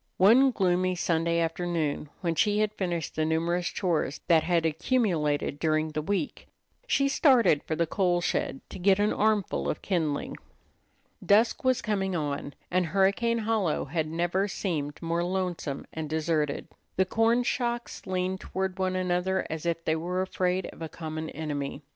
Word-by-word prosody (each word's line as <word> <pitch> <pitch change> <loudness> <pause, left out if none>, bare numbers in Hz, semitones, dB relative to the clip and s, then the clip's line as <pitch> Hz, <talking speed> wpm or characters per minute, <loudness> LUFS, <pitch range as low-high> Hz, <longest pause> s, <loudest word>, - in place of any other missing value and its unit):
One 235 +8 +6
gloomy 185 -4 +1
Sunday 170 -1 +1
afternoon 165 -3 -1
when 170 -3 0
she 205 +6 +2
had 215 0 +1
finished 175 -5 -3
the 155 - +1
numerous 170 +3 0
chores 165 -6 -1
that 165 -2 +5
had 170 0 +1
accumulated 160 - 0
during 155 0 +1
the 155 0 -3
week, 200 - -3 0.4
she 275 - +2
started 260 - +4
for 160 - -3
the 170 - +1
coal 175 +1 +1
shed 175 -5 -1
to - - -7
get 190 +1 +4
an 205 +1 +2
armful 210 -3 +1
of - - -3
kindling. 160 -7 -1 0.9
Dusk 220 +6 +3
was 255 -1 +2
coming 195 -3 -1
on, 145 -2 -3 0.2
and 180 -1 +2
Hurricane 200 +6 +2
Hollow 215 -8 0
had 155 +2 -2
never 175 +5 0
seemed 155 -7 -3
more 170 +1 0
lonesome 180 -6 -3
and 160 -1 -4
deserted. 155 -2 -1 0.3
The 190 - +3
corn 225 +5 +2
shocks 240 -1 -2
leaned 185 0 -1
toward 190 0 -3
one 185 0 0
another 185 +1 0
as 160 +1 -4
if 165 0 -2
they 160 - +2
were 180 +3 -1
afraid 185 0 -1
of - - -16
a 160 - -4
common 160 -1 -5
enemy. 145 -2 -4
175 Hz, 160 wpm, -28 LUFS, 160-195 Hz, 0.9 s, One